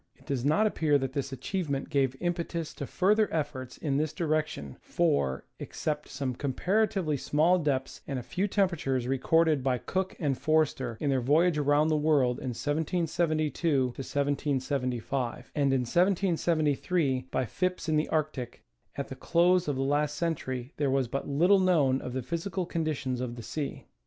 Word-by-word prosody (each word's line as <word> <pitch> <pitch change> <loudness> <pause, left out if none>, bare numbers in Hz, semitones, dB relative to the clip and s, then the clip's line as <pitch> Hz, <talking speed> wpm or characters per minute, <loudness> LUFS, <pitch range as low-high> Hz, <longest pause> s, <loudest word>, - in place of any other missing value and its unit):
It - - -23
does 135 -4 -2
not 155 +10 +3
appear 155 -8 +2
that 135 -1 -3
this 140 -1 -3
achievement 145 -1 -3
gave 135 -3 +2
impetus 170 -2 -2
to 140 - -6
further 210 +3 +2
efforts 135 -5 -3
in 140 -3 -1
this 155 +1 0
direction, 155 - -2
for, 70 -1 0
except 150 -1 -4
some 135 -2 -3
comparatively 180 - 0
small 160 +7 +3
depths 140 -4 -2
and 140 - -2
a 125 - -4
few 185 - -1
temperatures 170 - 0
recorded 150 +2 +2
by 130 -1 +1
Cook 190 +8 -2
and 145 -5 0
Forster 140 -6 +1
in 145 - 0
their 130 -1 +1
voyage 155 +5 +3
around 145 +2 +3
the 155 - +2
world 145 -5 +2
in 130 - -4
1772 155 -3 0
75, 135 -3 -2
and 140 -2 +2
in 135 -1 +2
1773 165 -3 +1
by 130 - 0
Phipps 180 - -2
in 155 - +2
the 155 - +1
Arctic, 150 -6 -2 0.3
at - - -4
the - - -7
close 180 +1 +3
of 145 - 0
the 135 - -1
last 145 +2 +1
century 140 -6 -3
there 145 -2 +1
was 135 -1 +1
but 135 +4 -4
little 175 +8 +4
known 150 -8 +3
of 125 - -6
the 130 -1 -2
physical 175 +5 -3
conditions 155 -7 -2
of 120 -2 -4
the 120 - -8
sea. 140 +6 -5
145 Hz, 165 wpm, -29 LUFS, 130-165 Hz, 0.3 s, little